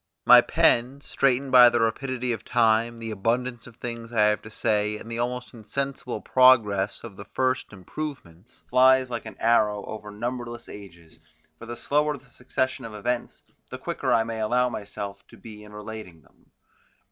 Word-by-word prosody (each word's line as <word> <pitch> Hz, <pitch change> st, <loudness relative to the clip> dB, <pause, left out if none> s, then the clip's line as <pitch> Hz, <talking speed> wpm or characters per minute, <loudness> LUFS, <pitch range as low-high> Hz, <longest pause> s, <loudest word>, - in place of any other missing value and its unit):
My -, -, +9 dB
pen 125 Hz, +4 st, +2 dB
straightened 135 Hz, -1 st, 0 dB
by 125 Hz, -1 st, +9 dB
the 120 Hz, -, 0 dB
rapidity 125 Hz, +2 st, -1 dB
of 110 Hz, -1 st, -6 dB
time, 115 Hz, 0 st, +2 dB
the 115 Hz, -1 st, -6 dB
abundance 120 Hz, +3 st, -2 dB
of 120 Hz, -, -14 dB
things 115 Hz, -1 st, -7 dB
I 115 Hz, -, +1 dB
have 105 Hz, -, -1 dB
to 110 Hz, -, -11 dB
say, 105 Hz, -1 st, 0 dB
and 115 Hz, -, -10 dB
the 115 Hz, -, -4 dB
almost 125 Hz, +1 st, -3 dB
insensible 125 Hz, +3 st, -4 dB
progress 110 Hz, -6 st, +3 dB
of 95 Hz, -, -10 dB
the 100 Hz, -, -9 dB
first 130 Hz, +4 st, -1 dB
improvements, 105 Hz, -, -9 dB
flies 130 Hz, 0 st, +4 dB
like 120 Hz, -2 st, -5 dB
an -, -, -10 dB
arrow 105 Hz, -3 st, +2 dB
over 105 Hz, -1 st, -8 dB
numberless 120 Hz, +2 st, -5 dB
ages, 85 Hz, -5 st, -13 dB, 0.4 s
for 115 Hz, -, -10 dB
the 120 Hz, -, -5 dB
slower 150 Hz, +3 st, 0 dB
the 130 Hz, -, -20 dB
succession 130 Hz, +1 st, -3 dB
of 110 Hz, -2 st, -8 dB
events, 120 Hz, +3 st, -3 dB, 0.3 s
the -, -, -6 dB
quicker -, -, -3 dB
I 115 Hz, -, +4 dB
may 115 Hz, 0 st, -5 dB
allow 125 Hz, +3 st, +1 dB
myself 100 Hz, -2 st, -7 dB
to -, -, -16 dB
be 105 Hz, -2 st, -12 dB
in 105 Hz, -, -14 dB
relating 105 Hz, -6 st, -9 dB
them. -, -, -29 dB
115 Hz, 175 wpm, -25 LUFS, 105-125 Hz, 0.4 s, My